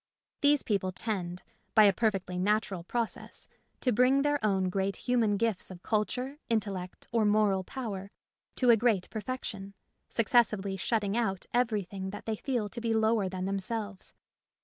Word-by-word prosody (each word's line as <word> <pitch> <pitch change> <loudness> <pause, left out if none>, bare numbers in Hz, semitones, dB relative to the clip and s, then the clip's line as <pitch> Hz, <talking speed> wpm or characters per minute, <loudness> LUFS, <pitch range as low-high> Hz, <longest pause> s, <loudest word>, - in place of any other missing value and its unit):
These 290 -1 +4
people 195 -3 0
tend, 180 -3 -3 0.3
by 215 - +8
a 200 -1 +6
perfectly 190 -4 0
natural 200 -2 0
process, 230 +5 -3 0.3
to 250 - +2
bring 255 +4 +4
their 290 -4 +1
own 190 -3 +2
great 195 +1 -1
human 230 -5 +1
gifts 220 -3 0
of 185 -1 -11
culture, 250 +6 -1
intellect, 195 -5 -2
or 230 -2 +2
moral 205 -2 +3
power 200 -4 -5 0.5
to 250 -2 +5
a - - +8
great 220 -5 +2
perfection, 210 -4 -5 0.3
successively 215 -4 +2
shutting 205 0 0
out 215 -6 0
everything 205 -6 0
that 205 - -8
they 220 - -1
feel 240 -5 -1
to 235 - -6
be 225 -1 0
lower 220 -3 +2
than 185 0 -4
themselves. 200 +1 -4
210 Hz, 150 wpm, -30 LUFS, 195-235 Hz, 0.5 s, by